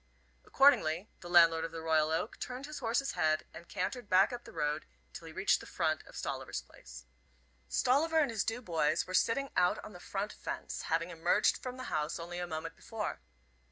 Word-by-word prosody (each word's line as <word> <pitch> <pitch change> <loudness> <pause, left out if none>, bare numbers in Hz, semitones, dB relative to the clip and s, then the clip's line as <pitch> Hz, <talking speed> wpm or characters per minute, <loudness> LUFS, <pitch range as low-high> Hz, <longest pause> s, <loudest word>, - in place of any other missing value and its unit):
Accordingly 205 - +4
the 175 - -9
landlord 165 -2 +6
of 165 - -4
the 165 - -6
Royal 160 -1 +2
Oak 160 +7 -2
turned 255 +2 -5
his 300 +1 -7
horse's 245 +3 0
head 155 -3 +1
and 170 - -11
cantered 200 +4 -3
back 190 +5 +5
up 240 0 -6
the - - -10
road 150 +1 -2 0.3
till - - -9
he - - -8
reached - - +2
the - - -11
front - - 0
of - - -14
Stolliver's 60 - -4
place. - - -13 0.6
Stolliver 285 - +2
and 295 -6 +3
his 220 -3 0
two 240 +3 -3
boys 165 -6 +1
were 185 - -7
sitting 270 +8 +2
out 180 0 +3
on 215 - -10
the 180 - -10
front 200 +3 -4
fence, - - -5
having 165 +2 0
emerged 165 +1 +3
from 255 0 -6
the 255 - -6
house 150 -1 -1
only 175 +1 -6
a 175 - -3
moment 165 0 -5
before. 220 -2 -5
180 Hz, 200 wpm, -33 LUFS, 160-235 Hz, 0.6 s, landlord